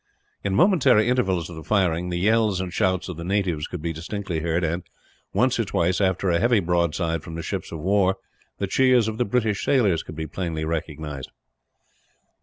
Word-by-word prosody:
In 100 -1 0
momentary 130 - +4
intervals 95 -9 +1
of 85 - -9
the 80 - -8
firing, 90 -2 +1
the 90 - -2
yells 105 0 +2
and 90 -1 -4
shouts 95 -2 +1
of 90 -4 -6
the 85 - -6
natives 90 -5 -1
could 90 -4 -7
be 85 -1 -2
distinctly 90 +1 -4
heard 85 +2 -1
and, 85 +2 -1 0.5
once - - +2
or - - +3
twice, 90 +3 0
after 95 -1 +1
a 85 - +2
heavy 120 0 +3
broadside 85 -2 0
from 80 0 -8
the 85 - -5
ships - - -4
of 80 - -5
war, 95 +1 +2 0.4
the 100 - -1
cheers 125 +2 +3
of 110 +1 -4
the 125 - +2
British 110 -2 0
sailors 105 - +2
could 80 - -10
be 80 0 -4
plainly 80 0 -3
recognized. 75 -3 -4
90 Hz, 195 wpm, -24 LUFS, 85-105 Hz, 0.5 s, momentary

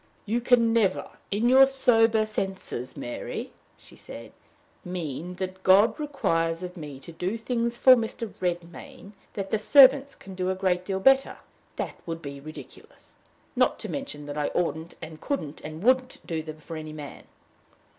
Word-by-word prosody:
"You 230 +3 0
can 235 -2 +4
never, 210 -5 +1 0.2
in 210 +5 +1
your 265 +2 +7
sober 225 -5 +3
senses, 190 - -5
Mary," 120 - -5 0.3
she - - -18
said, - - -11 0.5
"mean 175 -1 -5
that 185 0 -5
God 205 +8 +5
requires 165 - -1
of 180 0 -7
me 150 -5 -8
to 155 - -11
do 180 +6 -3
things 235 0 -2
for 255 +1 +8
Mr. 230 -2 -4
Redmain 175 +2 -5 0.2
that 195 -1 -4
the 220 - +1
servants 275 +3 +6
can 195 - -12
do 185 0 -2
a 190 - 0
great 185 -1 0
deal 190 0 -2
better! 270 +6 +4 0.4
That - - -5
would 165 0 -5
be 140 -1 -7
ridiculous 155 +2 -13 0.4
not - - +2
to - - -7
mention 210 - -5
that 145 +1 -5
I 145 - 0
oughtn't 165 -1 -2
and 160 -1 -9
couldn't 160 - -4
and 155 +3 -8
wouldn't 255 +2 +2
do 165 -3 -3
them 155 0 -9
for 165 +2 -8
any 155 -1 -7
man!" 150 -2 -9
185 Hz, 165 wpm, -26 LUFS, 165-230 Hz, 0.5 s, for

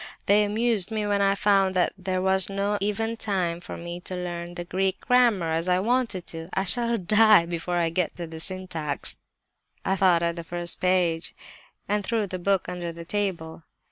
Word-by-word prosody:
They 205 +1 +4
amused 215 -1 +1
me 215 -2 -2
when 205 -1 +1
I 195 0 +3
found 195 -2 +2
that 180 - +2
there 185 -1 -2
was 190 0 +2
not 200 +1 -1
even 225 +3 -1
time 180 -6 -1
for - - -8
me 170 +1 -6
to 185 +1 -6
learn 175 -1 -5
the 175 - -4
Greek 190 +2 -1
grammar, 235 -10 +3
as 165 +2 -1
I 180 0 +3
wanted 230 -3 0
to 165 -1 -7
do. - - -15
'I 190 - +1
shall 235 +4 +2
die 215 -1 +5
before 170 +1 -3
I 170 -1 +1
get 165 0 -1
to 175 - -5
the 160 0 -9
syntax,' 165 -5 -2 0.7
I 190 - +1
thought 180 -3 +3
at 170 0 -1
the 170 - -5
first 175 0 -1
page—and 185 +3 -2
threw 225 0 0
the 185 -1 -5
book 195 +1 +1
under 175 -1 -4
the 170 0 -10
table. 170 -5 -3
185 Hz, 195 wpm, -25 LUFS, 170-205 Hz, 0.7 s, die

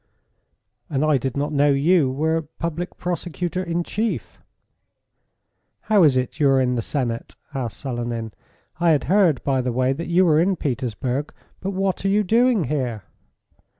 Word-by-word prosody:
"And 145 0 0
I 150 -3 +3
did 130 +2 -3
not 145 +2 -1
know 145 0 +3
you 145 +1 +3
were 160 +5 0 0.2
Public 170 +2 -4
Prosecutor 175 0 -3
in 170 -1 -1
Chief." 220 +5 -3 1.4
"How 215 -3 +3
is 145 -6 +5
it 130 +4 -2
you 145 -2 +4
are 135 -1 +4
in 125 -1 +1
the 120 - 0
Senate?" 120 -2 -3 0.2
asked 125 -5 -4
Selenin. 120 -4 -4 0.5
"I 170 0 +3
had 145 - +1
heard, 180 - +3
by 135 -2 +1
the 125 0 -1
way, 130 +2 +1
that 165 +5 -5
you 175 +2 +4
were 155 -3 +4
in 185 +3 +2
Petersburg. 130 - -2 0.3
But 195 +1 -3
what 190 0 -1
are 195 - +1
you 210 +2 +3
doing 230 0 +3
here?" 125 -7 -2
150 Hz, 165 wpm, -22 LUFS, 130-175 Hz, 1.4 s, is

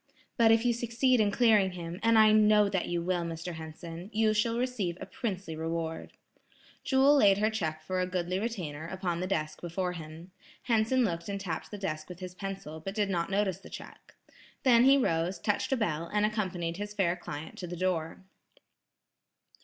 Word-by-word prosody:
"But 230 -2 +5
if 225 +1 +3
you 240 - +3
succeed 240 +2 +1
in 210 - +3
clearing 210 -4 +3
him, 175 0 -6
and 230 0 +4
I 215 -1 +7
know 210 -1 +5
that 190 -3 -1
you 175 -1 -1
will, 180 0 0
Mr. 170 +1 -5
Henson, 165 +3 -8
you 215 0 +2
shall 230 +2 +1
receive 235 -9 -2
a - - -6
princely 190 -7 -4
reward." 165 0 -4 0.7
Jewel 270 +2 +5
laid 200 -6 +5
her 215 +2 +2
check 155 -7 -3
for 185 +3 -1
a 180 - 0
goodly 180 0 -2
retainer, 170 -9 -4
upon 175 -1 -3
the 185 - -2
desk 155 -5 -2
before 180 +1 -2
him. 165 +1 -9 0.3
Henson 235 +2 +2
looked 170 -1 -3
and 200 0 -3
tapped 175 -5 -4
the 205 - -7
desk 155 -5 -4
with 180 -1 -9
his 185 -1 -7
pencil, 195 -4 -6
but 195 +5 -6
did 205 -2 0
not 170 -1 -1
notice 195 -2 0
the - - -13
check. - - -11 0.5
Then 245 -3 +6
he 275 +1 +7
rose, 170 -6 0
touched 205 +8 -1
a 265 - +2
bell, 170 -7 -1
and 210 0 +2
accompanied 180 -6 -2
his 205 +1 -6
fair 180 -4 +2
client 160 -3 -7
to 180 - -5
the 175 +1 -6
door. 175 -1 -2
190 Hz, 195 wpm, -30 LUFS, 170-215 Hz, 0.7 s, I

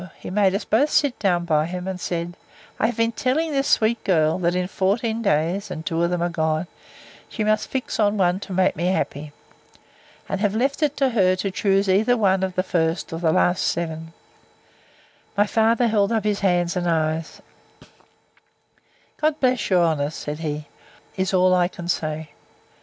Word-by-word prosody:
He - - -8
made 195 -1 +2
us 200 - -3
both 275 +8 +2
sit 285 -4 +1
down 175 -4 +1
by 155 -2 +1
him, 180 +1 -5
and 185 -1 -5
said, 175 0 -3 0.4
I - - +3
have 240 - -4
been 230 0 +2
telling 270 +7 -1
this 275 -1 0
sweet 225 +1 +2
girl, 160 -4 +2
that 175 0 0
in 180 0 -1
fourteen 220 +5 -1
days, 195 0 0
and 160 -3 -6
two 165 +1 -1
of 170 - +2
them 175 -1 -1
are 175 - 0
gone, 160 0 -1 0.6
she 220 - -3
must 215 0 +1
fix 260 -3 -3
on 210 0 +2
one 180 -1 +2
to 200 - -9
make 185 0 +2
me 170 - -2
happy. 150 -5 -2 1.0
And 195 - -3
have 205 -1 +1
left 270 +6 0
it 295 -1 0
to 270 -1 +2
her 190 -6 +3
to 195 +1 -3
choose 195 +1 +1
either 215 +6 +3
one 190 -3 +2
of 190 -1 -2
the 185 - +1
first 165 -2 -1
or 165 - -4
last 175 +2 +2
seven. 160 -1 -3 1.3
My 205 - +4
father 225 +3 +2
held 210 -1 +1
up 220 -3 0
his 210 -1 0
hands, 175 -3 +1
and 175 -1 -1
eyes; 160 0 -1 1.8
God 310 0 0
bless 255 -4 +1
your 180 -3 +4
honour! 150 -3 0
said 150 -1 -6
he, 150 -2 -4 0.5
is 190 0 -1
all 185 -1 +4
I 180 -1 +3
can 175 -1 -9
say. 155 -2 -2
185 Hz, 185 wpm, -22 LUFS, 170-215 Hz, 1.8 s, My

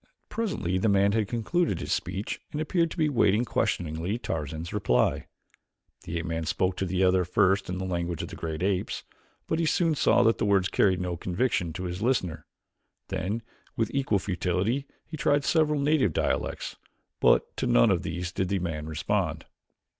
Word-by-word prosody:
Presently 140 - -1
the 110 - +2
man 100 0 +4
had 110 -1 +1
concluded 120 - 0
his - - -2
speech 100 +2 -3
and 150 - -3
appeared 165 +2 +1
to - - -9
be 155 -2 +3
waiting 120 -4 +3
questioningly 85 0 -1
Tarzan's 80 - -4
reply. 65 -12 +1 0.8
The 85 - -3
ape 85 - -3
man 80 -1 -3
spoke 90 +2 0
to 95 - -1
the 95 +1 +1
other 90 0 +4
first 95 +2 +2
in 90 - -2
the 95 - -3
language 85 -2 -2
of - - -6
the - - -8
great 80 0 -4
apes, 95 -1 -1 0.4
but 160 - -1
he 165 - +2
soon 165 0 +2
saw 120 -4 +4
that 115 0 +3
the - - 0
words 100 -2 +3
carried 95 -3 +3
no 90 -1 -2
conviction 90 -1 0
to 90 - -5
his 90 +1 -4
listener. 90 - 0 0.6
Then 105 +6 -2 0.3
with 110 -2 0
equal 130 -7 +2
futility 95 +8 -1 0.2
he 160 - -7
tried 145 +1 +2
several 155 -2 +2
native 140 - +2
dialects - - -1 0.4
but - - +3
to - - -1
none - - +5
of - - +1
these 85 +2 -4
did 95 0 -1
the 100 - +1
man 80 -4 -3
respond. 80 -1 -1
95 Hz, 185 wpm, -27 LUFS, 85-120 Hz, 0.8 s, none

